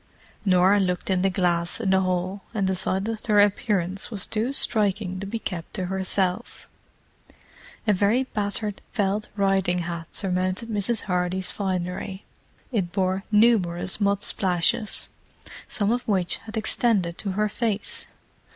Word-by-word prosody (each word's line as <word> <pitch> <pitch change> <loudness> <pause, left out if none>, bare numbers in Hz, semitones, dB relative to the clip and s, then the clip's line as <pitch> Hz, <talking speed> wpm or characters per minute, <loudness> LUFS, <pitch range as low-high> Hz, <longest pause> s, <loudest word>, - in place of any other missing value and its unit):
Norah 190 +1 +5
looked 180 0 -1
in 185 -1 +2
the 195 - +3
glass 175 -1 0
in 200 -5 0
the 190 - +5
hall, 185 +1 -1
and 200 -3 +1
decided 190 +1 +1
that - - -14
her 210 -2 +4
appearance 200 -3 +1
was 205 -5 -1
too 225 +4 -1
striking 205 -7 +1
to 200 - -5
be 230 - -3
kept 175 -7 -6
to 185 - -2
herself. 190 +2 -1 1.2
A 210 - +4
very 205 +7 +2
battered 210 -3 -3
felt 205 -1 0
riding 195 -3 +2
hat 170 -1 -5
surmounted 185 +3 -1
Mrs. 215 +1 0
Hardy's 180 0 0
finery; 190 0 -3 0.5
it 190 -8 -1
bore 190 0 0
numerous 210 -4 +3
mud 200 0 +2
splashes, 185 +3 +1 0.6
some 210 -2 0
of 245 +1 +1
which 190 -5 +2
had 220 0 -8
extended 210 -5 +2
to 195 -3 -2
her 210 +2 +1
face. 215 -1 -2
195 Hz, 140 wpm, -25 LUFS, 185-210 Hz, 1.2 s, Norah